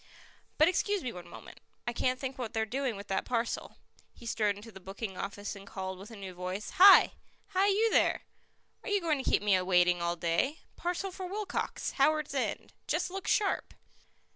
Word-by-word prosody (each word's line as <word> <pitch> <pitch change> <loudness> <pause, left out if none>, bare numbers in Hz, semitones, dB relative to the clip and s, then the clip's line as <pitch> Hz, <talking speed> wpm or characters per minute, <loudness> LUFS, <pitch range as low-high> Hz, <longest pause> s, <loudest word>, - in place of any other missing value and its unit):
"But 310 - +6
excuse 390 +2 +1
me 250 - -3
one 180 -1 -9
moment - - -12 0.3
I 240 - -2
can't 255 +2 0
think 265 -1 -4
what 235 -2 -4
they're 220 -1 0
doing 255 +1 -2
with 200 +1 -9
that 190 - 0
parcel." 235 -1 -2 0.4
He - - -14
strode 210 -3 +1
into 210 +3 -11
the 190 - -11
booking 195 +2 -6
office 205 +2 -5
and 200 0 -12
called 190 -1 -5
with 200 +3 -10
a 225 - -10
new 195 -3 -7
voice: 185 +3 -5
"Hi! 390 +1 +9 0.4
hi, 380 +2 +2
you 430 +3 +3
there! - - +3 0.6
Are - - -6
you 410 0 +3
going 310 -6 0
to - - 0
keep - - +2
me 195 -3 +4
waiting 180 -1 +3
all 170 0 0
day? 175 - 0
Parcel 360 +2 -3
for 370 0 -6
Wilcox, 410 +2 -3
Howards 300 +1 +2
End. 270 - -2
Just 365 - 0
look 385 0 -6
sharp!" 405 -3 +1
230 Hz, 195 wpm, -31 LUFS, -, 0.6 s, Hi